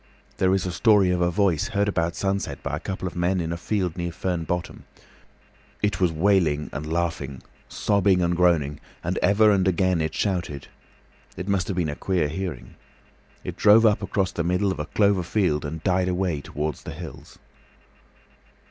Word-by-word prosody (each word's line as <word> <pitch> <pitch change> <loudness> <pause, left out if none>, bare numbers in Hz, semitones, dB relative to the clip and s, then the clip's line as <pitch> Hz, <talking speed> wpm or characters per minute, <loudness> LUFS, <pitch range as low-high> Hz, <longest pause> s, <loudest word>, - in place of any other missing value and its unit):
There 95 0 +3
is 95 - -1
a 90 - -2
story 100 0 +4
of 90 -1 0
a 85 - +3
voice 90 -4 +1
heard 100 +1 0
about 85 -4 0
sunset 95 -7 -2
by - - -2
a - - -4
couple 95 -1 -4
of 90 - -7
men 90 +2 +1
in 85 -1 -2
a - - -2
field 90 -1 -2
near 85 -1 -3
Fern 85 -1 -3
Bottom. 90 +1 -4 1.0
It 105 -2 0
was 90 -2 +3
wailing 80 -3 +1
and 75 +3 -5
laughing, 80 -6 -2 0.3
sobbing 100 -3 +2
and 85 0 +1
groaning, 80 -5 +2 0.2
and 90 +2 -1
ever 105 +3 +4
and 95 -2 +2
again 95 -1 +2
it 80 0 -2
shouted. 85 -8 -2 0.7
It 90 +2 -5
must 100 -3 0
have 95 - -3
been 80 -5 0
queer 90 -6 0
hearing. 85 -7 -6 0.7
It - - -5
drove 110 +2 +6
up 105 -2 +3
across 95 -2 -1
the 85 - -2
middle 90 +3 +1
of - - -5
a 75 - -3
clover 100 -3 +2
field 85 -4 0
and 80 +2 -6
died 90 0 +1
away 90 -5 -1
towards 75 -1 -4
the - - -7
hills. - - -10
90 Hz, 185 wpm, -24 LUFS, 80-95 Hz, 1.0 s, drove